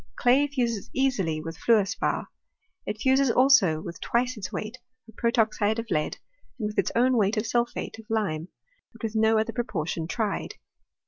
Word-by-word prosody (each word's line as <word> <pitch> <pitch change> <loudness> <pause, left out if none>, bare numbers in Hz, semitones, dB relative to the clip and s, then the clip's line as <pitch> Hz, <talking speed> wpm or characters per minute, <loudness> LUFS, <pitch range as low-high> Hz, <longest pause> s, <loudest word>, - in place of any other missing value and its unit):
Clay 265 +4 +4
fuses 240 -7 -2
easily 205 -13 +1
with 165 +1 -7
fluor 220 -4 +4
spar; 200 - -2 0.6
it 210 - -3
fuses, 265 +2 +3
also, 235 - +5
with 170 +1 -8
twice 250 +2 0
its 195 -4 -6
weight 215 +4 -5 0.3
of 225 - -16
protoxide 225 -2 +1
of 230 -2 -5
lead, 155 -2 0 0.4
and 220 - -3
with 210 0 -2
its - - +1
own 250 +2 +4
weight 210 +1 +2
of 215 - 0
sulphate 235 -1 -2
of 220 - -14
lime, 190 -8 -1 0.5
but 230 - -15
with 225 0 -3
no 220 0 +4
other 220 +1 0
proportion 170 -8 -3
tried. 215 +1 -2
225 Hz, 175 wpm, -26 LUFS, 200-240 Hz, 0.6 s, also